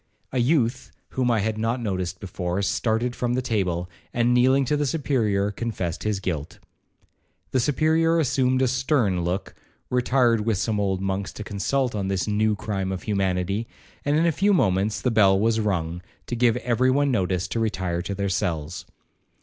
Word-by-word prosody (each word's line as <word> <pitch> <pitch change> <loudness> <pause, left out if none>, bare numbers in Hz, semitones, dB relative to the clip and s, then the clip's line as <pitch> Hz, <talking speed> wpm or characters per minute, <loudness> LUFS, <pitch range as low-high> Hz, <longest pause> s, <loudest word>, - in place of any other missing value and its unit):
A 130 - -1
youth 125 -1 +1 0.2
whom 130 -2 0
I 115 -3 +2
had 110 +1 -2
not 115 +3 0
noticed 95 -5 -3
before, 90 0 -3
started 115 +4 0
from 120 0 -1
the - - +1
table, 90 -7 -1 0.2
and 120 0 +2
kneeling 130 +2 +4
to 150 - +1
the 145 -1 0
Superior, 115 -9 0
confessed 100 -6 -3
his 105 -2 -1
guilt. 80 -6 -4 0.9
The 130 - +2
Superior 160 +5 +2
assumed 130 -3 +2
a - - +3
stern 125 - +1
look, 90 +3 -3 0.4
retired 125 -2 +3
with 110 -2 0
some 105 +2 -1
old 95 -2 0
monks 95 0 -2
to 105 - -7
consult 120 +6 -1
on 100 -2 -2
this 95 0 -1
new 105 +1 +2
crime 95 -1 -3
of 95 - -4
humanity, 100 +1 -1 0.4
and 145 +1 +2
in 165 - +3
a 170 - +4
few 200 +7 +2
moments 100 - +1
the 125 - 0
bell 100 -3 +5
was 110 +1 +2
rung, 90 -5 -1 0.2
to 120 - -3
give 120 0 +3
every 125 +1 +1
one 140 +1 +2
notice 95 -5 0
to 115 - -2
retire 95 -6 -1
to 100 +2 -4
their 100 0 -1
cells. 85 -2 -2
110 Hz, 180 wpm, -24 LUFS, 95-125 Hz, 0.9 s, bell